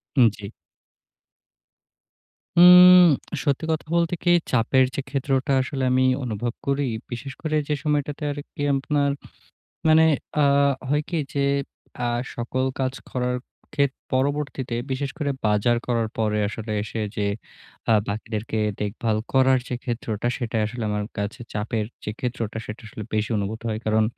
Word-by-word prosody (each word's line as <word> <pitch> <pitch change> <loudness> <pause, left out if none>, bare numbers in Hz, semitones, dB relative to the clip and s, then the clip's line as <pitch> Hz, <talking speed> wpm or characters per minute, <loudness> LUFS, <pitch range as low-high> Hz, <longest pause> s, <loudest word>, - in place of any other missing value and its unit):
হুম 125 -4 +7
জি। 100 - -7 2.1
হুম, 180 +1 +10 0.4
সত্যি 145 +1 0
কথা 160 0 -2
বলতে 170 0 +2
কি 175 - +4 0.2
চাপের 130 +2 +4
যে - - -1
ক্ষেত্রটা 135 0 0
আসলে 135 0 -3
আমি 130 0 +3 0.2
অনুভব 120 0 -3
করি 140 0 +1 0.2
বিশেষ 130 +3 -5
করে 155 -1 -1
যে 150 - +1
সময়টাতে 150 -1 -1
আর 145 - -6 0.2
কি 155 - -7
আপনার 140 +1 +1 0.8
মানে 160 +1 +6 0.4
আ - - +5 0.4
হয় 150 +1 +2
কি 170 - -1
যে 140 -1 +1 0.6
আ - - +1 0.3
সকল 130 +2 -1
কাজ 130 -1 0 0.2
করার 125 0 -1 0.4
ক্ষেত্রে 140 -2 0
পরবর্তীতে 135 -2 -1 0.2
বিশেষ 135 +1 -1
করে 150 -3 -1 0.2
বাজার 105 +3 +2
করার 115 -2 +1
পরে 105 -1 +1
আসলে 110 +1 -6
এসে 110 +1 -4
যে 105 -2 0 0.6
আ - - +6 0.2
বাকিদেরকে 110 +1 -3 0.2
দেখভাল 105 +1 -1 0.2
করার 130 0 +5
যে 125 - -2
ক্ষেত্রটা 115 -2 -3
সেটা 120 -3 -2
আসলে 115 +2 -5
আমার 105 0 -1
কাছে 100 +4 -3
চাপের 105 0 -2 0.2
যে 105 - -3
ক্ষেত্রটা 115 -3 -3
সেটা 105 - -7
আসলে 105 - -7
বেশি 110 0 0
অনুভূত 105 +3 -3
হয়। 110 -1 -2
কারণ 110 0 +3
125 Hz, 145 wpm, -24 LUFS, 110-140 Hz, 2.1 s, হুম